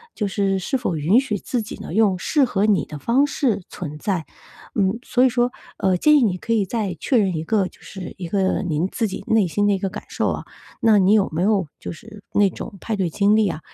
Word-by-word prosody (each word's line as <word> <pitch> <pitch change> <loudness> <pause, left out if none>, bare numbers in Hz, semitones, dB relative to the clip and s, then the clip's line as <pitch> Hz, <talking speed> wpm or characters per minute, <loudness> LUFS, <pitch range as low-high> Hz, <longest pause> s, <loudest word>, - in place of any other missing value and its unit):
就 210 - -1
是 195 0 0
是 230 +9 -1
否 235 -9 -2
允 160 +10 +4
许 225 -6 -2
自 240 +4 -2
己 215 - -7
呢， - - -7
用 205 -4 +3
适 285 - +2
合 205 -4 0
你 205 -6 +2
的 150 - -8
方 255 - +2
式 250 -8 0
存 150 -4 -7
在。 185 -4 -1 0.5
嗯， 200 +1 +1
所 250 +1 +3
以 - - +6
说， 245 0 +1 0.3
呃， 190 -3 +2
建 300 +10 +5
议 - - +3
你 185 -4 +1
可 230 - -2
以 215 -3 +2
再 200 -3 -2
确 255 - +1
认 190 -5 +2
一 155 - -2
个 195 0 +1
就 - - -18
是 190 -4 -8
一 175 -3 -6
个 195 -2 +1
您 165 +1 0
自 225 - -1
己 190 - -7
内 220 -3 +3
心 205 +4 +1
的 205 - +3
一 - - +1
个 195 - -2
感 210 - -8
受 - - -1
啊。 - - -4 0.3
那 225 -4 +5
你 190 +1 +4
有 210 -2 +4
没 170 +3 0
有 200 -5 +2
就 - - -7
是 210 +4 -12
那 205 -1 +4
种 200 +3 -8
派 225 - -3
对 190 -4 0
经 200 +5 +3
历 215 -3 +3
啊， 155 - -4
200 Hz, 270 characters per minute, -22 LUFS, 185-225 Hz, 0.5 s, 以